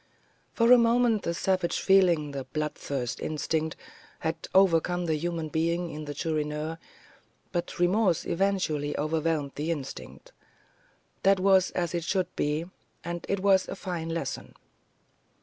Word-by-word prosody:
For 230 +1 +4
a 250 - +9
moment 235 -2 +3
the 170 - -2
savage 185 -1 0
feeling, 175 -6 +4
the 135 -2 -5
bloodthirsty 140 -3 -3
instinct, 155 +1 -1 0.5
had 160 0 -3
overcome 175 -1 +3
the 160 - +1
human 165 0 -2
being 170 +2 0
in 155 0 -6
the 145 0 -6
Chourineur; 155 +1 -2 0.7
but 175 -1 -3
remorse 180 0 +2
eventually 170 -6 0
overwhelmed 155 -1 0
the 150 +3 -3
instinct. 165 - -6 0.9
That 195 0 +4
was 190 -1 +4
as 175 -2 -1
it 170 -1 -1
should 185 +1 -1
be, 150 +3 -1 0.4
and 170 0 -5
it 200 -1 0
was 190 -1 +4
a - - -5
fine 170 -3 -4
lesson. 165 -5 -4
170 Hz, 135 wpm, -28 LUFS, 155-185 Hz, 0.9 s, a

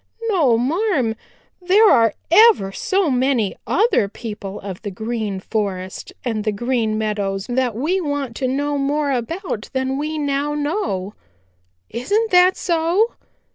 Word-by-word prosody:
"No, 300 - +3
marm. 275 - 0 0.5
There 390 +5 +5
are 230 - +4 0.2
ever 410 - +6
so 375 - 0
many 250 -5 +1
other 405 - +2
people 205 -3 -7
of 190 -2 -7
the 205 - -4
Green 220 -1 -3
Forest 190 -3 -4
and 220 -3 -1
the 215 - 0
Green 225 0 -1
Meadows 205 -3 -2 0.3
we 330 +11 0
want 285 -6 -3
to 260 - -1
know 285 +2 -1
more 285 +1 0
about 260 - -3
than 265 +1 -1
we 310 +1 -3
now 290 0 -1
know. 290 - -2 0.8
Isn't 410 - 0
that 360 +1 +5
so?" 345 +6 +1
265 Hz, 135 wpm, -20 LUFS, 215-330 Hz, 0.8 s, ever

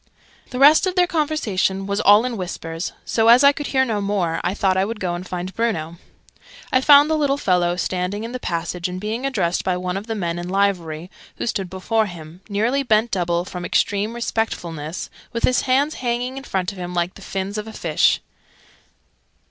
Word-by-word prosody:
The 250 - -6
rest 295 +7 +6
of 365 - -2
their 360 -1 +5
conversation 260 - 0
was 200 0 -1
all 205 +4 +6
in 250 -2 -2
whispers: 165 -3 -5
so, 225 -1 +1
as 240 +4 +7
I 280 - +8
could 290 0 -5
hear 265 -1 +2
no 215 -4 -1
more, 195 -5 -1
I 180 +3 -1
thought 190 -2 +2
I 190 - +2
would 215 +2 -4
go 180 -3 -2
and 175 +1 -6
find 180 +1 -4
Bruno. 170 -7 -2 0.7
I 255 - +3
found 285 +1 +7
the 315 - +1
little 285 -2 +1
fellow 180 -8 +1
standing 185 +3 -2
in 230 - -5
the 255 - -5
passage, 175 -2 -3
and 180 0 -5
being 220 +6 -2
addressed 180 -10 0
by 185 -1 0
one 180 +1 -3
of 205 +3 -7
the 225 - -2
men 175 -4 -2
in 175 +1 -5
livery, 180 -4 -1 0.2
who - - -4
stood 195 -5 -2
before 215 +4 0
him, 170 -1 -11
nearly 225 +7 +1
bent 225 -2 +2
double 175 -2 0
from 180 -1 -7
extreme 205 +5 0
respectfulness, 170 -9 -3 0.2
with 235 - -3
his 255 - +3
hands 280 +4 +3
hanging 245 +1 -2
in 270 0 -7
front 185 -1 -1
of 195 - -11
him 180 0 -5
like 175 +1 0
the - - -14
fins 195 +2 -4
of 210 - -6
a - - -7
fish. - - +2
200 Hz, 205 wpm, -21 LUFS, 180-240 Hz, 0.7 s, I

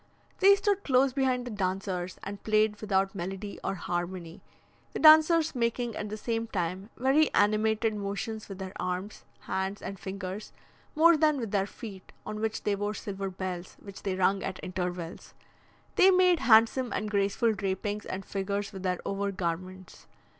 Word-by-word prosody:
They 395 +1 +7
stood 405 0 0
close 260 -1 +3
behind 255 -2 +1
the 245 - -5
dancers, 185 -2 -2
and 200 0 -7
played 215 -1 +2
without 195 -2 +1
melody 195 +2 -5
or 195 - -1
harmony; 175 -1 -4 0.5
the - - -3
dancers 315 +1 +7
making 235 -2 -1
at 210 - -4
the 215 - -5
same 230 +1 -2
time 185 0 -3
very 275 +5 +3
animated 215 +2 +2
motions 210 +2 -4
with 195 - -7
their 190 -1 -6
arms, 185 +3 -4 0.2
hands, 190 +1 -3
and 195 -1 -7
fingers, 190 +1 -6 0.4
more 335 +2 +7
than 305 -2 +3
with 225 -5 -4
their 195 -1 +1
feet, 200 -5 -10
on 215 - -5
which 220 0 -2
they 205 - +1
wore 205 +1 -2
silver 195 -1 -4
bells, 185 -1 -6
which 200 -1 -11
they 195 -2 -2
rung 190 +1 +2
at 185 - -4
intervals. 180 -2 -5 0.6
They 375 - +7
made 365 -2 +5
handsome 230 +2 +4
and 215 - -2
graceful 205 +3 +2
drapings 200 +1 -3
and 190 +1 -5
figures 200 +1 -3
with 190 - -7
their 180 -1 -1
over 200 0 -1
garments. 185 0 -5
205 Hz, 165 wpm, -29 LUFS, 190-230 Hz, 0.6 s, They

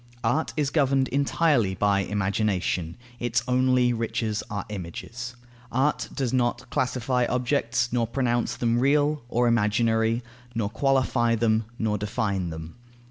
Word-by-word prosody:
Art 135 +8 +1
is 145 -2 +1
governed 135 -3 +2
entirely 140 - +2
by 100 0 +2
imagination; 95 -3 -1 0.2
its 120 0 0
only 125 -1 +3
riches 110 -2 -2
are 100 -2 -4
images. 110 +6 -6 0.4
Art 135 +5 +1
does 130 -3 -2
not 120 -2 0
classify 125 -1 0
objects, 125 -2 0
nor 120 -2 +1
pronounce 120 -1 0
them 120 0 +1
real 145 +3 +2
or 120 0 +2
imaginary, 115 +1 +2 0.3
nor 105 -3 -1
qualify 130 -3 +2
them, 110 -1 +1
nor 105 -3 0
define 100 -3 -1
them. 80 +3 -8
120 Hz, 130 wpm, -26 LUFS, 105-130 Hz, 0.4 s, only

